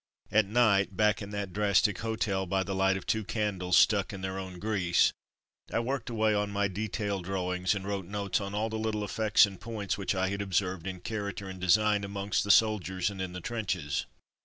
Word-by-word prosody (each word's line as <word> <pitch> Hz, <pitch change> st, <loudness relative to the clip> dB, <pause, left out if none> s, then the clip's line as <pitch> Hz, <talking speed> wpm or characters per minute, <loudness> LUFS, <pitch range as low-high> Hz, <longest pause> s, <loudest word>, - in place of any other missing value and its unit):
At 110 Hz, -1 st, +4 dB
night, 100 Hz, -4 st, +3 dB
back 105 Hz, -1 st, +3 dB
in 100 Hz, -, -6 dB
that 100 Hz, -3 st, -4 dB
drastic 105 Hz, -1 st, +2 dB
hotel 105 Hz, -4 st, -1 dB
by 95 Hz, +1 st, +1 dB
the 95 Hz, -, -4 dB
light 95 Hz, 0 st, +2 dB
of -, -, -8 dB
two 110 Hz, 0 st, 0 dB
candles 95 Hz, -4 st, 0 dB
stuck 100 Hz, -3 st, +4 dB
in 95 Hz, -2 st, -7 dB
their 95 Hz, 0 st, -3 dB
own 95 Hz, -1 st, -7 dB
grease, 95 Hz, -3 st, +2 dB, 0.6 s
I -, -, 0 dB
worked 125 Hz, 0 st, -2 dB
away 110 Hz, -2 st, +2 dB
on 105 Hz, 0 st, 0 dB
my 100 Hz, 0 st, 0 dB
detail 100 Hz, 0 st, -3 dB
drawings 90 Hz, +1 st, -1 dB
and 100 Hz, -1 st, -5 dB
wrote 100 Hz, -3 st, -3 dB
notes 100 Hz, +1 st, -1 dB
on 100 Hz, 0 st, -5 dB
all 110 Hz, +2 st, 0 dB
the 110 Hz, 0 st, -3 dB
little 110 Hz, -1 st, -1 dB
effects 110 Hz, +1 st, +4 dB
and 95 Hz, -2 st, -9 dB
points 110 Hz, -4 st, -3 dB
which 100 Hz, 0 st, -1 dB
I 95 Hz, 0 st, +1 dB
had 100 Hz, 0 st, -3 dB
observed 95 Hz, -2 st, -1 dB
in 95 Hz, -2 st, -5 dB
character 100 Hz, -2 st, -4 dB
and 95 Hz, -1 st, -8 dB
design 105 Hz, +3 st, +3 dB
amongst 100 Hz, 0 st, -1 dB
the 100 Hz, -, -6 dB
soldiers 100 Hz, -3 st, +3 dB
and 95 Hz, -1 st, -6 dB
in 95 Hz, -1 st, -4 dB
the 90 Hz, -, -6 dB
trenches. 90 Hz, -10 st, -2 dB
100 Hz, 210 wpm, -29 LUFS, 95-105 Hz, 0.6 s, At